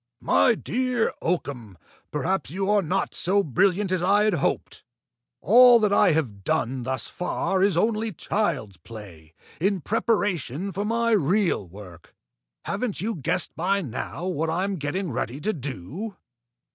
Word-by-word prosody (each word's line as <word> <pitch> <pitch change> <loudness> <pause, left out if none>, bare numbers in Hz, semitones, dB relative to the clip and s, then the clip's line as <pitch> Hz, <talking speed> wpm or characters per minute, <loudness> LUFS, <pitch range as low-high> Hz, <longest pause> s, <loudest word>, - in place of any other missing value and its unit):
"My 90 +1 +3
dear 250 -1 -1
Oakham, 125 - -3 0.3
perhaps 165 0 -1
you 195 +5 -1
are 210 -1 +4
not 185 +2 -1
so 200 +3 +1
brilliant 190 - +1
as 185 -2 +1
I 200 +3 +3
had 215 -1 +2
hoped! 175 - -2 0.6
All 245 +4 +7
that 210 -2 +2
I 180 - +5
have 115 -11 -2
done 130 -1 -1
thus 130 +1 -3
far 185 +1 -2
is 195 -3 +3
only 220 +3 +1
child's 160 - -2
play, 85 -5 -12 0.2
in 195 +3 +1
preparation 200 - -1
for 200 +3 -3
my 230 +1 +1
real 185 - +1
work. 90 -2 -13 0.5
Haven't 205 +1 -2
you 225 +4 -1
guessed 145 -9 -1
by 195 +4 0
now 135 +6 -5
what 165 -3 -1
I 170 +3 0
am 195 -1 -2
getting 160 +4 -3
ready 125 +2 -3
to 215 +7 -1
do?" 150 - -6
180 Hz, 150 wpm, -25 LUFS, 135-205 Hz, 0.6 s, All